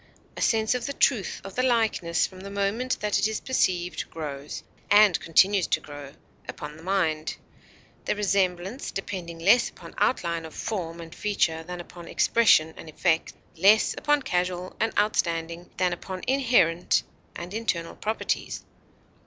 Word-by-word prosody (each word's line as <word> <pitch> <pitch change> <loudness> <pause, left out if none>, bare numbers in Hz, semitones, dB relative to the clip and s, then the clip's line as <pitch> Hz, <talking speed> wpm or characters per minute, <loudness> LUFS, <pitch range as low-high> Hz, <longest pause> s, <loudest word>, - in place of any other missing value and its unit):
a - - -6
sense 220 0 +2
of 250 +1 -3
the 280 - -3
truth 235 -9 +1
of 195 - -8
the 255 - 0
likeness 225 -9 +2
from 185 - -10
the 195 +1 -8
moment 200 +6 -1
that 210 -1 +1
it 205 - +3
is 220 -1 -3
perceived 180 -9 -1
grows 145 -3 -6 0.3
and 205 -2 +6
continues 190 +3 +3
to - - +1
grow 145 -2 -10 0.4
upon 150 0 -7
the 160 - -13
mind; 165 -4 -1 0.7
the - - 0
resemblance 195 +2 0
depending 180 -3 -5
less 200 +9 +4
upon - - -13
outline 170 -8 +1
of 160 -1 -10
form 170 -6 -4
and 165 0 -9
feature 170 -6 0
than 180 +1 -6
upon 175 0 -10
expression 160 -9 +4
and 160 - -10
effect, 160 +1 0 0.2
less 200 +6 +5
upon 295 -1 +1
casual 180 -1 -2
and 225 - +1
outstanding 170 -4 0
than 180 -1 +2
upon 185 +1 -7
inherent 240 -11 +3 0.3
and 175 +3 -7
internal 195 -7 -2
properties. 220 +1 -2
185 Hz, 155 wpm, -26 LUFS, 170-215 Hz, 0.7 s, and